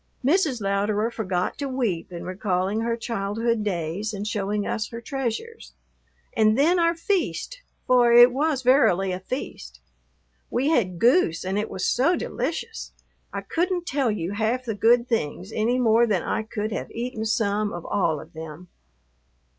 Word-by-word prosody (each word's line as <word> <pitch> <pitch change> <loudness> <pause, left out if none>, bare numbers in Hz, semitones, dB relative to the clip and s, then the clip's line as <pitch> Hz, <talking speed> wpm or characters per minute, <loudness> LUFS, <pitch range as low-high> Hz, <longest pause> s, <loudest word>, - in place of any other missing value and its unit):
Mrs. 295 - +2
Louderer 205 +3 0
forgot 185 -6 -2
to 280 -1 -2
weep 230 -11 -2
in 170 -1 -6
recalling 190 +2 -1
her 230 0 -1
childhood 225 0 -1
days 190 +2 -2
and 200 +1 -4
showing 205 -1 -1
us 215 - -2
her 230 - -7
treasures. 270 - -5 0.6
And 215 0 +4
then 335 +6 +4
our 335 0 +3
feast, 405 +8 -2 0.2
for 245 -2 +4
it 240 +1 +8
was 285 -1 0
verily 195 -8 +4
a 180 - -3
feast. 65 - -6 0.7
We 265 +5 0
had 190 - +1
goose 230 - +3
and 190 +2 -1
it 215 - -3
was 190 - -3
so 295 +9 +3
delicious. 455 - -4 0.4
I - - -4
couldn't 355 +1 -1
tell 275 -5 0
you 195 -4 -2
half 225 +5 -1
the 225 - -2
good 235 +3 +3
things 195 -3 -2
any 230 +3 +1
more 235 -1 +4
than 195 -6 0
I - - -1
could 215 0 -4
have - - -4
eaten 235 -1 -4
some 210 -1 0
of 175 -1 -7
all 165 -6 0
of - - -13
them. 160 +2 -9
220 Hz, 160 wpm, -24 LUFS, 195-255 Hz, 0.7 s, it